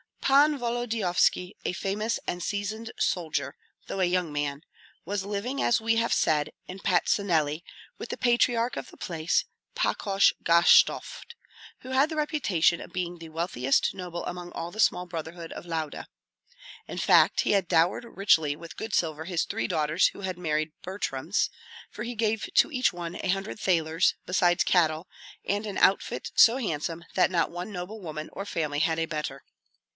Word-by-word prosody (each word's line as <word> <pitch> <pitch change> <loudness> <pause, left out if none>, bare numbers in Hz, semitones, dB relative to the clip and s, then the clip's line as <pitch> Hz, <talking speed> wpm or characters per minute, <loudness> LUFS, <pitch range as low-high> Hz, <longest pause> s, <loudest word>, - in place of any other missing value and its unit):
Pan 290 +2 +4
Volodyovski 225 -6 0
a - - 0
famous 210 +5 -1
and 175 - -3
seasoned 215 +4 -3
soldier, 150 -6 -1 0.3
though 195 - -4
a 185 - +4
young 180 -2 0
man 145 0 -3 0.4
was 195 +2 -2
living, 210 +7 -3
as 235 - +2
we 225 0 +2
have 230 +1 +2
said, 150 -1 +1 0.2
in 185 +1 -8
Patsuneli 170 -5 +1 0.4
with - - -7
the - - -4
patriarch 240 0 +2
of - - -6
the - - -16
place, 165 -1 0 0.3
Pakosh 195 -1 +2
Gashtovt, 170 - +4 0.5
who 255 - -10
had 270 +4 +3
the 320 - -4
reputation 250 - +1
of - - -11
being 175 -2 -3
the 165 -1 -10
wealthiest 155 -5 0
noble 180 -3 -6
among 175 0 -6
all 170 +1 -5
the 215 - -11
small 180 -4 +3
brotherhood 165 0 -7
of - - -8
Lauda. 160 -3 -4 0.8
In - - -7
fact, - - +4
he - - 0
had 195 -3 +2
dowered 170 +7 +2
richly 165 -9 +2
with 165 +2 -11
good 220 -1 -3
silver 160 -2 -1
his 175 -2 0
three 115 - -2
daughters 155 +3 +2
who - - -8
had 185 -2 -4
married 155 -2 -1
Butryms, 180 -3 -2 0.4
for 210 - -6
he 240 +1 -5
gave 220 -1 -1
to - - +5
each 255 -7 +1
one 175 0 -6
a - - -3
hundred 195 +3 -2
thalers, 165 -4 +2
besides 175 -1 +3
cattle, 165 -1 +2 0.4
and 205 +2 -1
an 200 - -4
outfit 195 - +2
so 230 - +7
handsome 165 - -3
that 185 - +4
not 170 -3 +1
one 175 +4 -6
noble 190 +3 -6
woman 155 -4 -6
or 195 - -6
family 150 -6 -2
had 160 +1 +1
a 165 - 0
better. 150 -4 -5
180 Hz, 170 wpm, -27 LUFS, 160-210 Hz, 0.8 s, so